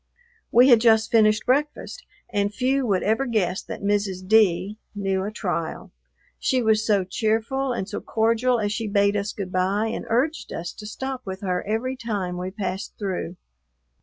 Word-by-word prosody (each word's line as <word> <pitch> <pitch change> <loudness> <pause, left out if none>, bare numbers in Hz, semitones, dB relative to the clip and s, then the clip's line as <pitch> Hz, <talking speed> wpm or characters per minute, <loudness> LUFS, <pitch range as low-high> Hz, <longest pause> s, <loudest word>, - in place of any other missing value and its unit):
We 245 +3 +6
had 235 -3 +7
just 225 -1 +4
finished 215 -2 +4
breakfast, 290 +4 -1 0.3
and 205 -1 +1
few 260 +3 0
would 195 -3 +1
ever 225 +6 +1
guess 190 -6 0
that - - -8
Mrs. 200 -2 -1
D 205 -1 +3 0.2
knew 195 -2 -1
a 200 - -2
trial; 175 -6 -4 0.5
she 255 -2 +1
was 220 -1 +3
so 205 -3 +2
cheerful 225 +7 -1
and 215 -6 -3
so - - -5
cordial 230 +2 +1
as 205 -1 -1
she 225 0 -2
bade 200 0 +2
us 205 +1 -1
good 190 -3 -6
bye 195 +4 +1
and - - -5
urged 275 +8 0
us 170 +1 -5
to 210 - -9
stop 265 +4 -5
with 190 -1 -6
her 180 -2 -1
every 235 +5 -1
time 200 -8 -3
we 180 +1 -3
passed 190 +1 -5
through. 185 -3 -3
215 Hz, 175 wpm, -24 LUFS, 195-230 Hz, 0.5 s, had